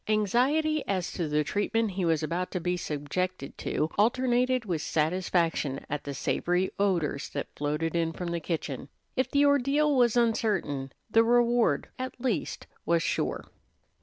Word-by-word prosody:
Anxiety 260 +9 +2
as 185 -3 -1
to 170 -4 -2
the 150 0 +1
treatment 210 +5 0
he 185 -1 -1
was 160 -2 +1
about 175 +4 -2
to 180 - -1
be 180 +1 0
subjected 155 +1 -3
to 155 - -1
alternated 250 +2 +2
with 170 -6 -1
satisfaction 165 -3 0
at 150 - -3
the 140 -1 -4
savory 180 +7 0
odors 175 -8 0
that 140 - -5
floated 150 +3 -1
in 165 -1 +1
from 175 +1 -5
the 170 0 -1
kitchen. 150 -5 -4 0.3
If 260 - +1
the 285 0 +3
ordeal 285 +1 +3
was 245 -2 +4
uncertain, 205 - 0 0.2
the 225 +1 +6
reward 240 0 +3
at 255 0 -5
least 240 - -2 0.2
was 170 0 +2
sure. - - -1
185 Hz, 155 wpm, -28 LUFS, 160-240 Hz, 0.3 s, the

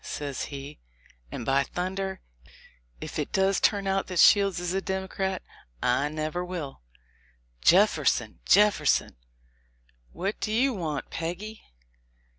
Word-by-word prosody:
says 140 -3 -4
he; 140 - -8 0.5
"and 120 - -5
by 135 +2 +3
thunder! 190 +3 -3 0.8
if - - -6
it - - -3
does 195 0 +2
turn 200 -2 +2
out 195 0 0
that 185 - -5
Shields 195 0 +5
is 175 0 -2
a 195 - 0
Democrat, 190 0 -3 0.4
I 135 - +1
never 155 +3 -3
will"— 170 - -6 0.8
"Jefferson! - - +3
Jefferson 205 - +3 0.5
!" - - -38
"What 195 +4 -3
do 215 - -2
you 255 +4 +2
want, 155 - -4
Peggy?" 190 +7 -5
180 Hz, 125 wpm, -27 LUFS, 145-195 Hz, 0.8 s, Shields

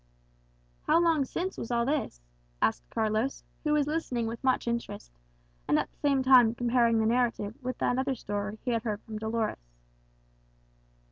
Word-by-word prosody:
"How - - +5
long 325 -5 +3
since 365 +8 -4
was - - -5
all 235 -1 +1
this?" 270 - -2 0.4
asked - - 0
Carlos, 220 +4 -1 0.2
who 300 -1 +1
was 300 -1 +3
listening 290 -6 -2
with 230 +3 -5
much 260 -2 +1
interest, 235 - -4 0.6
and - - +3
at - - -1
the - - -34
same 275 -2 +1
time 250 -3 +6
comparing 235 -1 +2
the 220 - +2
narrative 230 -3 +1
with 255 -1 -4
that 250 - +1
other 265 0 0
story 205 -1 -4
he 250 - 0
had 230 -1 0
heard 210 -2 -4
from 215 -2 -7
Dolores. 220 - -3
235 Hz, 165 wpm, -29 LUFS, 220-265 Hz, 0.6 s, time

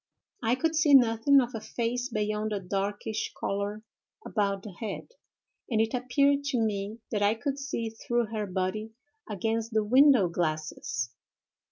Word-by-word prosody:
I 235 +1 +2
could 325 +4 0
see 305 -2 +6
nothing 245 +2 +5
of 245 0 -4
a 225 - -4
face 240 +3 -2
beyond 215 -1 -1
a 205 - -1
darkish 200 +3 -3
color 200 +2 -2 0.4
about 200 -2 -1
the 210 - -7
head, 200 - -6 0.6
and 225 -4 +1
it 225 0 +1
appeared 280 +3 +2
to 280 -3 0
me 215 0 -2
that 210 - 0
I 205 +2 +3
could 280 +4 -3
see 235 -5 -3
through 240 +1 -1
her 210 -2 -2
body 190 +4 -2 0.4
against 225 +3 -2
the 220 -1 +3
window 255 -2 +6
glasses. 155 -7 -2
220 Hz, 155 wpm, -28 LUFS, 205-245 Hz, 0.6 s, see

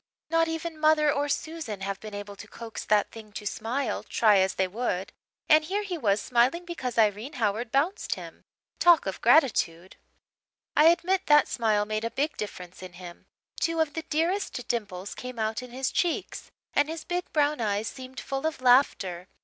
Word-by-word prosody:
Not 330 0 +3
even 325 0 -4
mother 305 -1 +4
or 285 +1 -1
Susan 300 -10 -4
have 195 0 -3
been 215 -1 -8
able 205 0 -7
to 205 - -10
coax 230 +1 -8
that 210 -1 +2
thing 220 -2 -11
to 210 - -7
smile, 225 +3 -2
try 210 -3 +3
as 190 0 +1
they 190 - +1
would. 190 -2 -3 0.3
And 310 0 +6
here 400 +5 -1
he 385 -3 -4
was 215 -10 +1
smiling 250 +11 +1
because 260 -9 -5
Irene 220 +5 +2
Howard 225 -1 -1
bounced 305 +10 0
him! - - -11 0.4
Talk 345 -3 +6
of 195 -1 -4
gratitude! 220 - +3 0.8
"I 300 - +6
admit 360 +3 +3
that 295 -1 +6
smile 215 -3 +1
made 215 +1 -2
a 230 - -1
big 295 +6 -1
difference 180 -4 -7
in 185 -1 -9
him. 175 -1 -11 0.3
Two 330 -1 0
of 315 -3 +1
the 325 - -3
dearest 325 - -1
dimples 205 -5 -3
came 250 -1 -8
out 220 +1 -1
in 250 - -9
his 260 +2 -2
cheeks 345 -2 -2 0.2
and 290 +1 +2
his 325 -1 -5
big 355 0 -3
brown 295 -3 +1
eyes 210 0 0
seemed 260 0 -8
full 270 +3 -2
of 320 - -4
laughter. 225 -9 +3
250 Hz, 185 wpm, -27 LUFS, 210-310 Hz, 0.8 s, And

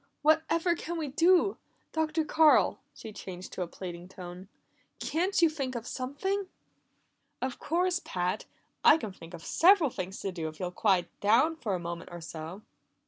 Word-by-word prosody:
What 310 +1 +5
ever 340 +1 +2
can 340 0 -4
we 310 -3 -2
do? 350 +7 +4 0.3
Dr. 315 0 0
Carl," 315 0 +5
she 220 - -10
changed 185 -2 -8
to - - -4
a 180 - -1
pleading 175 0 -8
tone, 180 0 -9 0.5
"can't 360 +5 0
you - - +8
think 275 -5 -3
of 230 -1 -4
something?" 370 +12 -2 0.9
"Of 260 -1 -3
course, 355 +3 +1
Pat! 180 0 -2 0.4
I 305 - +8
can 220 -10 -5
think 170 -2 -11
of 165 - -11
several 345 -5 +5
things 190 -1 -5
to 195 - -2
do 165 -3 -4
if 155 0 -9
you'll 180 -1 -2
quiet 185 -2 +2
down 235 +11 +4
for 220 -11 -2
a - - -3
moment 170 0 -6
or 175 - -7
so." 165 +4 -8
235 Hz, 175 wpm, -30 LUFS, -, 0.9 s, you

